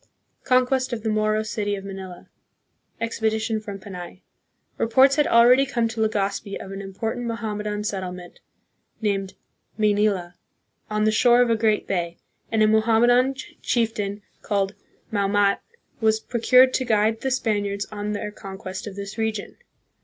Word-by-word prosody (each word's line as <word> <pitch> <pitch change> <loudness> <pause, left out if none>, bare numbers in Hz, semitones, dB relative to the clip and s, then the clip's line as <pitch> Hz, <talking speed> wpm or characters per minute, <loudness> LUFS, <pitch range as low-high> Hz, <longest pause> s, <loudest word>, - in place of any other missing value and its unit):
Conquest 255 0 +2
of 220 -2 -4
the 220 - 0
Moro 215 0 +1
City 210 -2 -2
of 195 0 -8
Manila. 190 -2 -8 0.7
Expedition 220 -1 -1
from 205 -2 -7
Panay. 185 -2 -9 0.6
Reports 265 +4 +5
had 295 - +3
already 245 +3 +6
come 240 -4 0
to 225 0 -4
Legazpi 200 -2 -1
of 195 - -8
an 195 0 -6
important 220 +5 -4
Mohammedan 210 -2 -3
settlement 180 -3 -5 0.6
named 195 -3 -1 0.2
" - - -44
May 215 -1 +3
nila/' 200 -4 0 0.6
on 215 0 0
the 215 - +3
shore 240 +2 +5
of 240 - 0
a - - +4
great 220 -1 +1
bay, 170 -3 -2 0.3
and 220 -1 +3
a - - +5
Mohammedan 235 +4 +4 0.3
chieftain, 210 -3 -1 0.2
called 200 -1 -1 0.4
Maomat, 200 -1 +2 0.4
was 220 -1 +2
procured 255 +3 +4
to 260 - +1
guide 220 -1 +1
the 265 - -1
Spaniards 205 -5 -1
on 210 0 -3
their 210 0 -4
conquest 190 -1 -8
of 200 - -7
this 200 +2 -7
region. 220 -2 -2
215 Hz, 150 wpm, -24 LUFS, 200-230 Hz, 0.7 s, already